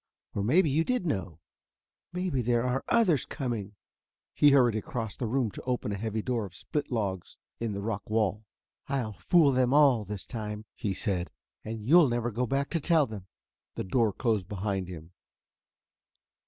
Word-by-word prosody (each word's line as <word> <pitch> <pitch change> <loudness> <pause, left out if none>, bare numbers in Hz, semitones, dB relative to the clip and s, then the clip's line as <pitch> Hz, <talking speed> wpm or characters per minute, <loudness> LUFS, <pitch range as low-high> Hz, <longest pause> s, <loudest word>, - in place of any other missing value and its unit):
Or 100 - -1
maybe 160 - +4
you 150 +3 +2
did 250 -1 -1
know 90 - -3 0.7
maybe 180 -7 -1
there 120 0 +1
are 125 +1 0
others 190 - +3
coming...." 115 -8 -4 0.6
He 145 - +6
hurried 125 -5 +5
across 110 0 -4
the 120 - -3
room 120 -2 0
to - - -8
open 125 -4 -2
a - - -1
heavy 110 +1 -3
door 120 -3 -1
of 90 - -17
split 150 -2 -4
logs 100 -6 -3 0.2
in 115 -2 -2
the 100 0 -4
rock 105 -1 -4
wall. 110 -1 0 0.5
"I'll 125 -6 -1
fool 145 - +4
them 130 +1 +2
all 140 -7 +5
this 105 -1 -6
time," 105 -2 -5
he 100 -3 -3
said; 90 -5 -1 0.3
"and 110 -1 -6
you'll 165 -1 +7
never 120 0 -1
go 125 +3 -1
back 140 +2 -1
to 165 - +1
tell 160 -1 +3
them." 105 -6 -9 0.5
The - - -3
door 110 +3 +2
closed 110 -4 0
behind 95 -2 -2
him. 85 -2 -9
115 Hz, 175 wpm, -29 LUFS, 105-135 Hz, 0.7 s, you'll